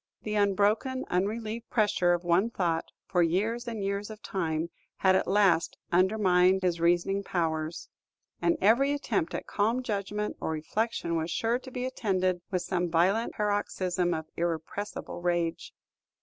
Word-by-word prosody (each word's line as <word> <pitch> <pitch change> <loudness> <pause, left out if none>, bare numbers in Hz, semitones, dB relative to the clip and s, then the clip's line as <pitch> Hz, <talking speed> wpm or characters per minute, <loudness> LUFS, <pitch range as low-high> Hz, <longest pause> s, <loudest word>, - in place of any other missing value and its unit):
The 210 - -3
unbroken, 210 +5 +1
unrelieved 220 +5 -2
pressure 200 -5 +2
of 175 0 -1
one 175 +6 +3
thought, 170 -7 -1 0.2
for 180 -2 +1
years 215 +8 0
and 225 -4 -3
years 200 +1 -2
of 215 -1 -10
time, 165 -3 -2 0.3
had 190 -1 +4
at - - +1
last 190 -5 +3
undermined 185 0 +4
his 170 -2 0
reasoning 175 +3 +2
powers; 165 -3 -2 0.5
and 335 -2 +2
every 270 +7 +4
attempt 215 - -1
at - - -4
calm 225 +5 0
judgment 210 -1 -3
or - - -2
reflection 170 +2 -2
was 160 +1 -2
sure 230 +5 0
to 260 - -11
be 250 0 -4
attended 185 -8 0
with 185 -3 -1
some 175 -1 -1
violent 185 +7 +2
paroxysm 185 -4 0
of 160 - -4
irrepressible 170 +3 -4
rage. 175 -1 -1
190 Hz, 150 wpm, -29 LUFS, 175-215 Hz, 0.5 s, had